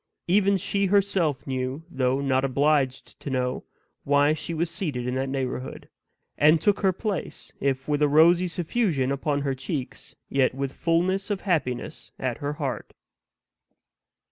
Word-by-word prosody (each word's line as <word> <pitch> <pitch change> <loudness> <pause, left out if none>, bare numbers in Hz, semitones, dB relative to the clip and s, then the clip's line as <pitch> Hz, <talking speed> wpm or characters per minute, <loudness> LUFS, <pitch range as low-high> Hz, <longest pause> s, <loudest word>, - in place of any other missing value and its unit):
Even 200 +2 +3
she 200 +1 0
herself 190 -7 +1
knew, 130 +2 -3
though 130 -4 0
not 135 -1 +1
obliged 135 0 0
to - - -6
know, 125 -1 -2 0.4
why 145 +1 +3
she 155 - -5
was 165 +1 0
seated 150 - -3
in 125 - -2
that 135 +1 -1
neighborhood; 130 -1 -4 0.5
and 155 +2 +6
took 205 +5 +2
her 190 -2 +3
place, 195 -1 -5
if 135 -1 -1
with 150 0 0
a 150 - +5
rosy 170 +5 +5
suffusion 170 - 0
upon 140 +1 -1
her 140 -1 -1
cheeks, 130 0 -6
yet 130 -2 +1
with 135 0 -3
fullness 180 +4 0
of 205 -2 -2
happiness 155 -10 -2
at 130 -3 -3
her 145 +1 -2
heart. 140 -5 -4
145 Hz, 150 wpm, -25 LUFS, 130-175 Hz, 0.5 s, and